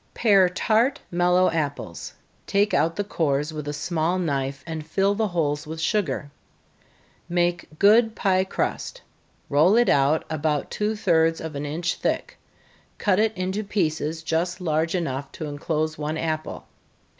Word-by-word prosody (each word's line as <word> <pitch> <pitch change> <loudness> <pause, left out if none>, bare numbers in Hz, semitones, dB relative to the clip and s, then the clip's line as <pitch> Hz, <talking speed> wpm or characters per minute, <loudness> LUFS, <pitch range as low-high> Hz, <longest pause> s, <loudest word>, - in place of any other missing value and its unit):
_ - - -39
Pare 195 -5 +5
tart, 225 +8 +1
mellow 180 +1 +3
apples 145 - -4 0.3
take 205 +2 +2
out 165 +1 +2
the 205 - -1
cores 150 -5 -1
with 150 -1 -6
a - - -1
small 160 +3 -1
knife, 140 -5 -2
and 160 -2 -5
fill 195 +6 +1
the 220 +1 0
holes 150 -5 -1
with 160 +1 -6
sugar. 160 - -1 1.0
Make 175 -2 -1
good 220 +4 +5
pie 190 -2 +2
crust 190 - -3 0.4
roll 155 +8 +4
it 240 +1 +4
out 140 +3 +3
about 155 -2 -1
two 210 +1 -1
thirds 165 -5 +2
of 160 -1 -6
an 145 +1 -3
inch 165 +4 -2
thick, - - -2 0.6
cut 200 -2 +2
it 220 -2 +1
into 190 +3 -2
pieces 160 -5 -1
just 175 +3 -1
large 160 0 0
enough 140 -5 -3
to 160 - -6
enclose 155 +1 -2
one 155 +1 -2
apple. 155 -1 -3
165 Hz, 155 wpm, -24 LUFS, 155-190 Hz, 1.0 s, Pare